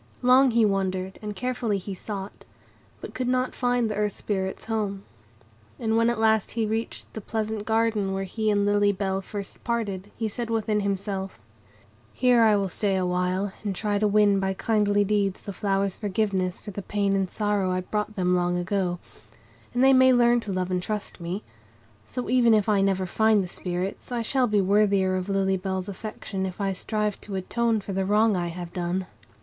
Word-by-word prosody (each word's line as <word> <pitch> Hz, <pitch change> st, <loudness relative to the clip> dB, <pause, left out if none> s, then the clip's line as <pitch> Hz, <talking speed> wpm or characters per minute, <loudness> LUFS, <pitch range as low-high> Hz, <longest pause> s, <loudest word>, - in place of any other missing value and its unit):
Long 255 Hz, +2 st, +6 dB
he 230 Hz, -2 st, +4 dB
wandered, 190 Hz, -1 st, -1 dB
and 210 Hz, -1 st, -5 dB
carefully 245 Hz, -2 st, -1 dB
he 195 Hz, +1 st, -6 dB
sought; 195 Hz, +1 st, -7 dB, 0.6 s
but -, -, -8 dB
could 255 Hz, -1 st, -2 dB
not 255 Hz, 0 st, +1 dB
find 245 Hz, -2 st, +1 dB
the 215 Hz, -, -2 dB
Earth 210 Hz, -1 st, -1 dB
Spirits' 190 Hz, -2 st, -3 dB
home. 205 Hz, -3 st, -2 dB, 0.7 s
And 220 Hz, -1 st, 0 dB
when 230 Hz, +1 st, +4 dB
at 235 Hz, -2 st, -1 dB
length 220 Hz, -1 st, +2 dB
he 225 Hz, -1 st, 0 dB
reached 220 Hz, +2 st, -4 dB
the 220 Hz, -, -6 dB
pleasant 215 Hz, 0 st, -3 dB
garden 220 Hz, -3 st, +1 dB
where 195 Hz, 0 st, -2 dB
he 215 Hz, +3 st, -2 dB
and 205 Hz, -1 st, +2 dB
Lily 205 Hz, 0 st, +3 dB
Bell 195 Hz, -1 st, -2 dB
first 200 Hz, 0 st, -8 dB
parted, 205 Hz, -5 st, -2 dB
he 225 Hz, -, -1 dB
said 230 Hz, +2 st, -4 dB
within 220 Hz, -2 st, 0 dB
himself,— 195 Hz, -, -3 dB, 0.7 s
"Here 250 Hz, -2 st, +4 dB
I 220 Hz, -2 st, +5 dB
will 200 Hz, -1 st, +1 dB
stay 195 Hz, +1 st, -1 dB
awhile, 185 Hz, +1 st, 0 dB
and 200 Hz, -3 st, -2 dB
try 205 Hz, +1 st, -1 dB
to 210 Hz, -, +3 dB
win 205 Hz, -1 st, +4 dB
by 190 Hz, 0 st, -1 dB
kindly 205 Hz, -1 st, +2 dB
deeds 200 Hz, -2 st, 0 dB
the 200 Hz, -, -6 dB
flowers' 195 Hz, 0 st, -1 dB
forgiveness 195 Hz, -3 st, -1 dB
for 210 Hz, -, -8 dB
the 200 Hz, -, -5 dB
pain 200 Hz, 0 st, 0 dB
and 190 Hz, -1 st, 0 dB
sorrow 205 Hz, -2 st, 0 dB
I 185 Hz, 0 st, 0 dB
brought 210 Hz, +3 st, -3 dB
them 180 Hz, -2 st, +2 dB
long 175 Hz, 0 st, +1 dB
ago; 175 Hz, 0 st, -1 dB, 0.7 s
and 245 Hz, -, +1 dB
they 270 Hz, 0 st, +7 dB
may 260 Hz, 0 st, +6 dB
learn 240 Hz, 0 st, +4 dB
to 210 Hz, -3 st, -5 dB
love 185 Hz, -1 st, -2 dB
and 180 Hz, -1 st, 0 dB
trust 210 Hz, +1 st, -4 dB
me. 180 Hz, +5 st, -4 dB, 0.6 s
So, 250 Hz, -, -4 dB
even 240 Hz, -2 st, +5 dB
if 210 Hz, -1 st, +1 dB
I 205 Hz, -2 st, +3 dB
never 190 Hz, -1 st, +1 dB
find 215 Hz, +2 st, +3 dB
the -, -, -5 dB
Spirits, 180 Hz, +5 st, -4 dB
I 240 Hz, -1 st, -1 dB
shall 255 Hz, +2 st, +2 dB
be 210 Hz, -2 st, +2 dB
worthier 195 Hz, -1 st, +3 dB
of 185 Hz, +1 st, -3 dB
Lily 195 Hz, -1 st, +1 dB
Bell's 190 Hz, 0 st, -3 dB
affection 195 Hz, -1 st, -5 dB
if 185 Hz, -, -8 dB
I 195 Hz, -1 st, 0 dB
strive 210 Hz, +2 st, -2 dB
to 200 Hz, -, -6 dB
atone 225 Hz, +4 st, 0 dB
for 195 Hz, -, -6 dB
the 190 Hz, 0 st, 0 dB
wrong 210 Hz, +2 st, +3 dB
I 175 Hz, -1 st, -1 dB
have 175 Hz, 0 st, -7 dB
done." 180 Hz, +1 st, -2 dB
205 Hz, 195 wpm, -26 LUFS, 190-220 Hz, 0.7 s, they